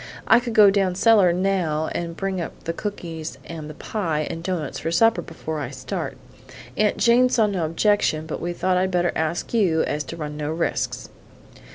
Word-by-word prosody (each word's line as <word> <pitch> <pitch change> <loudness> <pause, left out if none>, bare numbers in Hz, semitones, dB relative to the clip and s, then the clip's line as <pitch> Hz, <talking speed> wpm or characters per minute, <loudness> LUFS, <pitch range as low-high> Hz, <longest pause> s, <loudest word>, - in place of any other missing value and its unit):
I 225 - +7
could 240 -1 -5
go 205 -2 +8
down 195 -2 +1
cellar 205 -3 +5
now 175 -4 0
and 170 -1 -4
bring 195 -2 -2
up 165 - -7
the 165 - -2
cookies 165 -5 -5
and 160 -2 -7
the 155 - -9
pie 160 -8 -2
and 165 - -6
doughnuts 170 -5 -3
for - - -3
supper 225 +7 +4
before 160 -2 -6
I 140 - -4
start. 130 -2 -5 0.6
Aunt 210 -1 +2
Jane 245 +2 +4
saw 225 -3 +3
no 190 -5 -1
objection; 165 -2 +1
but 160 - -5
we 175 - -2
thought 185 +1 0
I'd 185 +1 +1
better 175 -1 +1
ask 160 +6 -2
you 180 -8 +3
so - - -2
as 150 0 -2
to 165 - -7
run 150 -2 -5
no 150 0 -3
risks." 165 +2 -2
175 Hz, 200 wpm, -23 LUFS, 160-200 Hz, 0.6 s, go